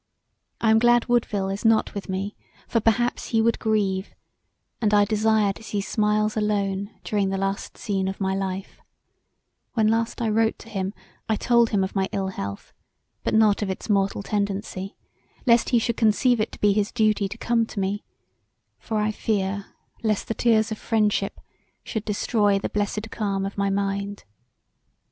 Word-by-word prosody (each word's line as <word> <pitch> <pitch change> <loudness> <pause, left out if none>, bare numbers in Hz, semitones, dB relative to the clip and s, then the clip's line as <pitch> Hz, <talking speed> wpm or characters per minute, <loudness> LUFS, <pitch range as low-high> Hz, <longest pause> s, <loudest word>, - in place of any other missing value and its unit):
I 220 - +3
am 220 - +6
glad 240 0 +4
Woodville 215 -5 +1
is 195 +1 -4
not 225 -1 +3
with 200 -1 -6
me 195 +2 -3 0.3
for 230 - +1
perhaps 230 +2 +1
he 225 - +1
would 230 +1 +2
grieve, 200 -3 0 0.7
and 210 -2 +3
I 205 0 +5
desire 215 -1 +2
to - - -14
see 215 -2 -3
smiles 210 +1 +1
alone 200 -2 0
during 200 -2 0
the 195 - -1
last 195 +1 -3
scene 195 -2 -1
of 190 - -4
my 190 -1 0
life; 190 0 -4 0.9
when 220 -2 +3
I - - +3
last 230 0 -4
wrote 225 -1 +1
to 230 - -13
him 195 -1 -3 0.3
I 220 - +3
told 235 +1 +3
him 200 -3 +1
of 190 - -3
my 190 -1 +1
ill 195 -1 -1
health 100 - -6 0.5
but - - 0
not 215 -2 +4
of 205 - -1
its 190 +3 -3
mortal 195 0 +1
tendency, 200 -1 -3 0.5
lest 235 -2 +4
he 245 - +4
should 235 0 0
conceive 225 +2 +3
it 215 - -1
to - - -10
be 205 -1 +4
his 210 0 0
duty 215 -3 +2
to 215 - -7
come 230 -1 +1
to 205 - -6
me 195 +2 -1 0.8
for 220 - -3
I 210 0 +1
fear 200 -2 -1 0.3
lest 215 -3 0
the - - -1
tears 220 -1 +2
of 220 - -4
friendship 210 -3 0 0.4
should 220 -3 -4
destroy 205 -1 +2
the 195 - -3
blessed 210 +1 -2
calm 195 -3 -1
of 195 - -5
my 200 0 0
mind. 200 +1 -2
210 Hz, 180 wpm, -24 LUFS, 195-220 Hz, 0.9 s, am